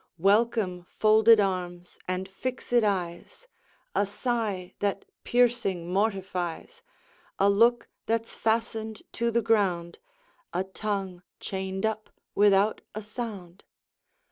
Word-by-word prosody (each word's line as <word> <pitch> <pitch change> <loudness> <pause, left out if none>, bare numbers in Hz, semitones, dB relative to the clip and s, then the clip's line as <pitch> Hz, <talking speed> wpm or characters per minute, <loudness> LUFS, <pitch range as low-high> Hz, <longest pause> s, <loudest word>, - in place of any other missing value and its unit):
Welcome, 200 -1 +2 0.2
folded 220 +1 +6
arms, 180 -3 -2
and 185 +1 -2
fixèd 245 +3 -1
eyes, 190 - -3 0.5
A - - +2
sigh 205 -4 -2
that 200 -1 -1 0.2
piercing 230 -8 +1
mortifies, 195 - -2 0.6
A 195 - +4
look 235 +4 +3 0.2
that's 230 0 -1
fastened 220 -1 -1
to 235 0 0
the 235 0 +1
ground, 190 -6 +1 0.5
A 180 +2 0
tongue 190 -2 -4 0.2
chained 190 +1 -3
up 220 0 -2 0.2
without 205 +1 +4
a 215 - -4
sound! 205 -5 -7
205 Hz, 105 wpm, -27 LUFS, 185-225 Hz, 0.6 s, folded